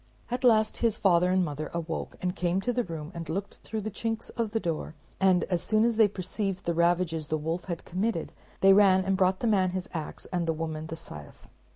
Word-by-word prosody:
At 245 +1 -2
last 220 -3 +4
his 230 -2 +1
father 180 -2 +4
and 185 0 +3
mother 150 0 -4
awoke, 165 -1 -4
and 180 0 -1
came 180 +1 0
to 245 +4 -1
the 245 +1 +1
room 160 -3 -6
and 165 -1 -7
looked 195 +5 -4
through 220 0 -5
the 215 +1 -4
chinks 225 +2 -3
of 230 -2 -2
the 225 +1 -1
door; 165 -3 -3 0.2
and 185 -2 +4
as 180 -3 -1
soon 215 +1 +3
as 235 -1 +2
they 220 -2 +7
perceived 195 0 -3
the 170 - +1
ravages 170 -2 +1
the 155 - 0
wolf 160 +3 -3
had 170 -3 -5
committed, 185 -1 -2 0.3
they 195 0 +7
ran 190 -2 +5
and 195 0 +2
brought 185 0 +2
the - - -1
man 190 -4 +3
his 185 - -5
ax 160 -3 -5
and 175 -2 0
the 165 - +2
woman 160 -1 -4
the 165 - -5
scythe. 75 - -11
185 Hz, 230 wpm, -28 LUFS, 165-210 Hz, 0.3 s, they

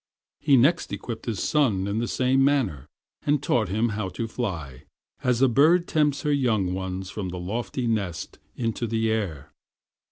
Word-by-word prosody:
He 140 -3 +4
next 150 +8 +3
equipped 115 -1 -6
his 110 -5 -2
son 120 -11 +2
in 100 +2 -1
the 120 - -1
same 130 +2 +2
manner, 115 - +1 0.4
and 145 +1 +3
taught 120 -7 +1
him 110 +5 +1
how 105 -3 -3
to 115 +6 -4
fly, 80 - -5 0.4
as 125 0 +2
a - - +7
bird 160 +8 +4
tempts 145 -3 +1
her 150 - +2
young 110 -10 +1
ones 95 0 -4
from 100 -4 -4
the 90 - -5
lofty 105 +6 -3
nest 100 -7 -2 0.2
into 115 0 -2
the 110 0 0
air. 95 -11 -3
115 Hz, 170 wpm, -25 LUFS, 95-130 Hz, 0.4 s, a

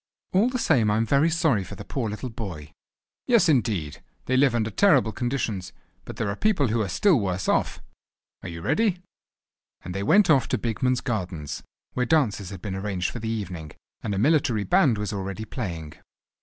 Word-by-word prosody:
"All 205 +6 +4
the 255 - -2
same 135 - +3
I 105 - +2
am 115 - +1
very 140 +8 +3
sorry 155 - +2
for - - -9
the 100 - -9
poor 120 -5 -2
little 110 +4 -5
boy." 85 -10 -7 0.6
"Yes, 230 -7 +5
indeed! 110 - 0 0.2
they 130 - 0
live 130 -2 +4
under 110 -1 0
terrible 140 - +4
conditions, 110 -7 -3 0.3
but - - -8
there 110 - -2
are 100 - -2
people 185 - +1
who 115 +1 +1
are 100 - -2
still 185 - +3
worse 95 -3 -2
off. - - 0 0.6
Are - - -7
you 85 -1 -7
ready?" 180 - +1 0.8
And 90 - -6
they 95 - -3
went 195 - +5
off 135 -6 +4
to - - 0
Bigman's 125 +2 0
Gardens, 90 - -4 0.3
where 125 -1 0
dances 110 - +1
had 95 -2 -9
been 100 -3 -4
arranged 95 -2 -2
for 120 - -6
the 110 0 -4
evening, 90 -8 -5 0.3
and 105 -3 -2
a - - -2
military 135 -3 +2
band 150 - +3
was 105 -1 -3
already 100 +2 -4
playing. 85 - -5
110 Hz, 195 wpm, -25 LUFS, 95-140 Hz, 0.8 s, Yes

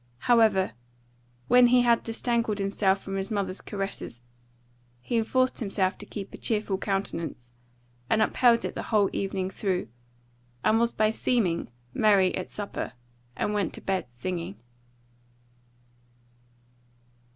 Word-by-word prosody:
However, 220 - +4 0.8
when 245 0 +7
he 250 +1 +5
had 235 -1 +4
disentangled 230 -2 -1
himself 195 -1 +1
from 195 0 -4
his 195 +2 -2
mother's 200 -3 -2
caresses, 195 - -5 0.8
he 180 - -4
enforced 255 +3 +1
himself 195 -3 0
to - - -9
keep 200 -2 -7
a - - -7
cheerful 210 -4 -1
countenance, 170 - -3 0.6
and 220 - +3
upheld 235 +2 +4
it - - -3
the - - -4
whole 210 -3 +3
evening 190 -1 -2
through, 185 - -2 0.7
and 225 - +4
was 235 0 +2
by 215 0 +2
seeming 215 -7 0 0.2
merry 200 -4 +4
at 185 - -4
supper, 205 -1 -4 0.4
and 210 - -1
went 205 -2 -1
to - - -9
bed 190 -8 -1
singing. 125 - -5
200 Hz, 130 wpm, -27 LUFS, 190-225 Hz, 0.8 s, when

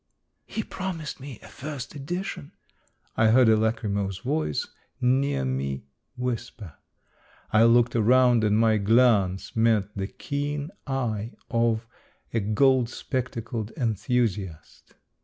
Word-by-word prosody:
" - - -51
He 220 - -3
promised 180 -8 -5
me 135 -3 -8
a - - -11
first 140 -2 -7
edition," 150 - -5 0.6
I 110 - +4
heard 120 +2 +6
a 110 - +6
lachrymose 100 -3 -1
voice 75 -4 -1 0.3
near 130 - +1
me 65 +1 -2 0.3
whisper. 120 - -4 0.8
I 110 +1 +6
looked 120 +1 +4
around, 120 +1 +4
and 105 0 +3
my 110 -1 +4
glance 105 -3 +3
met 110 -3 +2
the 95 -1 -2
keen 145 - -4 0.2
eye 120 -4 -2 0.2
of 115 -1 +1 0.5
a 115 - +2
gold 120 +4 +3
spectacled 120 -4 -4
enthusiast. 110 - -2
115 Hz, 120 wpm, -26 LUFS, 105-130 Hz, 0.8 s, heard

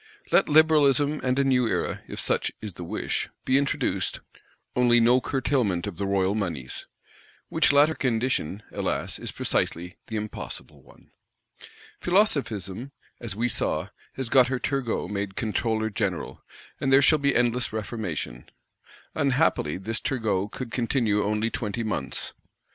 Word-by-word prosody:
Let - - +4
Liberalism 150 -2 +4
and 130 0 +1
a 140 - +4
New 125 -3 +3
Era, - - -1
if - - -6
such - - +1
is 105 -3 -6
the 85 - -8
wish, 85 - -2 0.2
be 130 - +3
introduced; 140 -1 -1 0.6
only 120 -1 +5
no 120 +2 +5
curtailment 125 -10 0
of 100 -5 -6
the 100 - -2
royal 95 0 +2
moneys? 85 -12 -4 0.6
Which - - +3
latter 145 +2 +5
condition, 115 - -1
alas, - - -2
is - - -5
precisely 90 +2 -2
the 110 - -5
impossible 105 0 -6
one. - - -21 0.9
Philosophism, 140 - 0 0.3
as 115 -4 -5
we 120 +3 +1
saw, - - 0 0.2
has 130 -2 -4
got 130 -1 +6
her 130 +1 -1
Turgot 125 -8 -2
made 100 -1 -3
Controller 110 0 -1
General; 100 -5 -3 0.4
and 135 - 0
there 135 +1 +7
shall 155 +2 +5
be 140 -1 +2
endless 120 0 +1
reformation. 100 - -4 0.6
Unhappily 135 - +1
this 110 +4 -2
Turgot 110 -5 -1
could 125 -3 -6
continue 115 -4 +1
only 105 +2 0
twenty 110 +1 -3
months. 80 - -3
115 Hz, 140 wpm, -26 LUFS, 100-135 Hz, 0.9 s, there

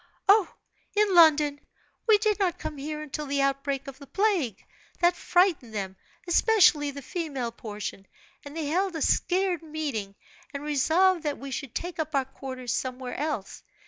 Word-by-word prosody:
"Oh, 400 -1 +5 0.4
in 415 -2 +3
London! 305 -4 +6 0.5
We 435 -2 +7
did 425 0 +1
not 370 -4 +1
come 300 - -6
here 300 +2 -4
until 300 0 -5
the 280 0 +1
outbreak 275 0 -1
of 275 0 -9
the 280 - -12
plague 365 - 0 0.3
that 350 0 +4
frightened 350 - +1
them, 190 -2 -3 0.3
especially 350 -6 +4
the 280 0 -8
female 275 -8 -3
portion, 210 -3 -7 0.4
and 285 +2 -9
they 320 - -2
held 360 +4 0
a 320 - -3
scared 365 -2 +1
meeting, 290 -11 -4 0.4
and 280 - -4
resolved 320 +5 +3
that 295 -2 -2
we 275 0 -8
should 265 -2 -5
take 350 -1 -4
up 310 -1 -2
our 270 -1 +2
quarters 255 -2 -6
somewhere 255 -1 -3
else. 290 -9 -3
295 Hz, 165 wpm, -27 LUFS, 270-350 Hz, 0.5 s, We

